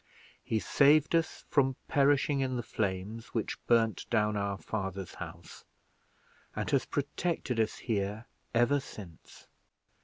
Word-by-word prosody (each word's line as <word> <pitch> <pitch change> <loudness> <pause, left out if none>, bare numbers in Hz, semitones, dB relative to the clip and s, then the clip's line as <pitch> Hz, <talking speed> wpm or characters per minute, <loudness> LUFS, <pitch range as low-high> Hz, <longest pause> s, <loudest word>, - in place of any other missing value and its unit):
He 110 - 0
saved 145 +7 +4
us 165 -1 0
from 135 -2 +2
perishing 145 0 +3
in 130 -1 0
the 120 - -2
flames 105 +2 -3
which 115 - -2
burned 115 -2 +3
down 105 -2 +2
our 100 -1 -1
father's 95 -4 -4
house, - - -9 0.9
and - - -2
has 135 -3 +2
protected 145 -3 -2
us 110 -1 +1
here 105 0 -2 0.3
ever 120 +4 +3
since. 95 - -12
115 Hz, 125 wpm, -31 LUFS, 105-140 Hz, 0.9 s, saved